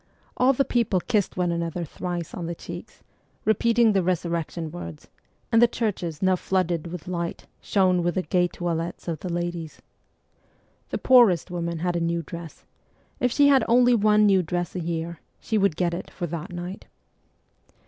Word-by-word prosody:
All 255 +1 +4
the 275 +1 +1
people 230 -6 +1
kissed 205 0 -1
one 180 -1 +1
another 170 0 -2
thrice 175 +1 -5
on 170 -2 -5
the 170 - -4
cheeks, 175 +6 -10 0.4
repeating 230 +1 +3
the 195 - +3
resurrection 170 -2 -2
words 85 - -8
f - - -32 0.4
and 225 - +5
the 240 - +8
churches, 195 -9 -3
now 185 0 +4
flooded 175 -3 -1
with 175 0 -8
light, 170 -2 -4 0.2
shone 185 -3 +2
with 175 0 0
the 185 - 0
gay 180 -2 +2
toilettes 170 -1 -4
of 165 -3 -2
the 180 - -5
ladies. 175 -2 -4 1.1
The - - -2
poorest 225 -10 +5
woman 170 -1 -3
had 175 -1 0
a - - +1
new 170 0 -1
dress; 170 0 -9 0.5
if 250 - +1
she 285 +3 +5
had 270 -2 +5
only 245 +1 +5
one 210 -1 +4
new 195 -2 +5
dress 175 +1 -3
a - - -1
year, 165 -1 -3 0.2
she 220 - -1
would 195 -5 +2
get 175 0 0
it 175 - -5
for 175 - -5
that 170 +3 -5
night. 175 +2 -7
175 Hz, 180 wpm, -25 LUFS, 170-205 Hz, 1.1 s, the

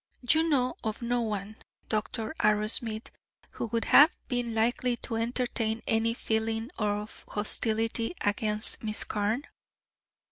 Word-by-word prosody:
"You 320 +6 +4
know 255 -4 +1
of 220 +1 -3
no 240 +1 +1
one, 215 -1 -4 0.3
Dr. 220 +4 -2
Arrowsmith, 215 +1 +1 0.4
who - - -4
would 230 +1 -1
have 300 +5 +8 0.2
been 245 -3 -1
likely 240 +2 +1
to 230 - -3
entertain 230 -1 -1
any 225 +1 +1
feeling 225 +2 -1
of 210 0 -2
hostility 225 +5 0
against 210 +1 +2
Miss 215 -1 -1
Carne?" 215 +7 -1
225 Hz, 120 wpm, -29 LUFS, 215-240 Hz, 0.4 s, have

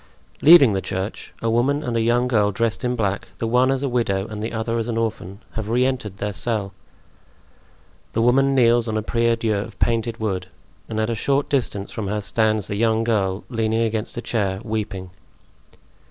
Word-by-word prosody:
Leaving 145 -8 +8
the 95 - 0
church, 95 +4 -5
a 115 - +1
woman 140 +6 +1
and 120 -5 -2
a 115 - +2
young 120 +2 +2
girl 105 -4 +2
dressed 115 +4 -1
in 125 0 0
black, 100 -4 -1
the - - -2
one 125 +3 +3
as 135 0 0
a - - +1
widow 115 -6 0
and 105 -1 -6
the 110 - -3
other 115 0 -2
as 115 - -2
an 115 -1 -2
orphan, 110 -3 -3
have 110 -1 -5
re 125 +2 +2
entered 125 -7 -3
their 105 +1 -3
cell. 105 -2 -2 1.4
The 115 - +1
woman 135 +3 +3
kneels 120 -2 +4
on 110 -1 -1
a 110 - -2
prie 115 +1 +1
dieu 115 -1 -1
of 100 0 -5
painted 115 0 0
wood 95 -5 -2 0.4
and 110 - -2
at 110 +1 0
a - - 0
short 140 +5 0
distance 115 -7 -1
from 105 -3 -4
her 105 +2 -1
stands 110 0 +1
the 105 - -3
young 110 0 +2
girl, 100 -4 0
leaning 115 -2 0
against 110 0 -2
a 120 - -4
chair, 100 -4 -1
weeping. 100 -5 -4
115 Hz, 200 wpm, -22 LUFS, 105-120 Hz, 1.4 s, Leaving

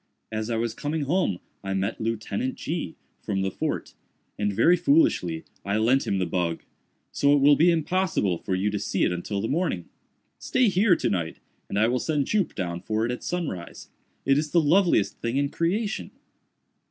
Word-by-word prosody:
As 110 +1 -3
I 115 - 0
was 115 0 -1
coming 150 +1 -2
home 140 - +1 0.3
I 95 0 -2
met 95 +4 -2
Lieutenant 115 +2 -2
G——, 155 - -4 0.3
from 95 -2 -1
the 95 - -1
fort, - - -3 0.4
and, 105 0 0
very 115 - +4
foolishly, 175 - +2 0.2
I 100 +1 0
lent 120 +5 +2
him 100 - +1
the 95 - 0
bug; 85 -1 -2 0.5
so 145 0 +3
it - - +3
will 145 +1 +6
be 165 +5 +5
impossible 165 - +1
for 95 - -2
you 100 +3 0
to 105 - -2
see 95 - -1
it - - +2
until 95 +3 -3
the 110 - -1
morning. 145 - -1 0.5
Stay 255 -4 +2
here 190 0 +4
to - - -1
night, 85 -4 -2 0.3
and 100 - -2
I 110 +2 +4
will 125 +1 +1
send 150 -1 0
Jup 205 +1 0
down 90 -2 -3
for 110 +1 -1
it 120 - -1
at 125 - -5
sunrise. 155 - -4 0.4
It 135 +1 +4
is 155 0 -2
the 170 - +4
loveliest 165 - +3
thing 115 +3 -1
in 140 0 +1
creation!" 200 +8 -1
120 Hz, 190 wpm, -26 LUFS, 100-165 Hz, 0.5 s, will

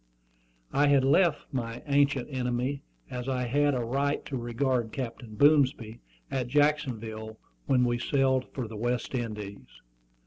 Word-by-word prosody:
I 145 +1 +4
had 140 -2 +4
left 155 +2 +3
my 120 -2 -4
"ancient 140 -3 +2
enemy," 125 +2 -1 0.3
as 125 +1 -4
I 130 -1 0
had 145 +3 +2
a 125 - -1
right 140 +4 -1
to 140 - -5
regard 120 -1 -1
Captain 115 -3 -6
Boomsby, 135 -4 +3 0.3
at 130 -2 -1
Jacksonville 115 -6 0 0.3
when 125 -2 +4
we 120 0 0
sailed 130 0 +2
for 125 -4 -4
the 110 0 -8
West 120 +3 -2
Indies. 105 -5 -5
125 Hz, 140 wpm, -28 LUFS, 115-140 Hz, 0.3 s, I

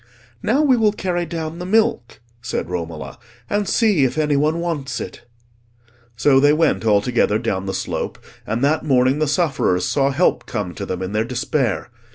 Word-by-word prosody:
"Now 265 +8 +2
we 265 -4 +4
will 215 -2 +3
carry 175 -4 -2
down 160 +1 -5
the 180 - -5
milk," 215 - +1 0.2
said 115 -5 -4
Romola, 80 - -5 0.3
"and 205 -1 -1
see 210 - +3
if 130 +3 0
any 150 -2 +2
one 155 +4 +1
wants 150 -6 -3
it." 120 - -8 0.9
So 135 +3 +4
they 145 +2 +5
went 160 -4 +2
all 105 -2 +4
together 115 -2 +1
down 95 -4 -2
the 95 - -2
slope, - - -3 0.3
and 115 +4 -1
that 150 +2 +2
morning 130 -1 +2
the 155 - +1
sufferers 140 - +1
saw 140 -1 +1
help 150 +7 +1
come 105 -7 -3
to - - -6
them 95 0 -3
in 95 - -4
their 105 +1 +1
despair. 125 -2 -2
140 Hz, 185 wpm, -20 LUFS, 110-170 Hz, 0.9 s, they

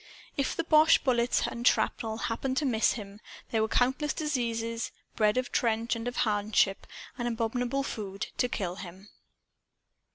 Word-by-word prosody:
If 275 - -1
the 330 - -1
boche 315 0 +5
bullets 245 -2 +2
and 235 +1 -1
shrapnel 220 -1 +1
happened 260 +3 -2
to 300 - +1
miss 230 -4 +3
him, 205 -2 -8 0.3
there 225 - +2
were 220 - +2
countless 265 +6 +1
diseases 230 -6 -2 0.2
bred 215 +1 +3
of 255 -1 -1
trench 230 0 +1
and 230 +1 -5
of 245 - -3
hardship 205 -2 +1 0.3
and 240 - -1
of 235 - -1
abominable 245 +4 -1
food 200 -6 -4
to 250 - +2
kill 185 -6 -3
him. 190 +2 -10
230 Hz, 160 wpm, -29 LUFS, 215-255 Hz, 0.3 s, boche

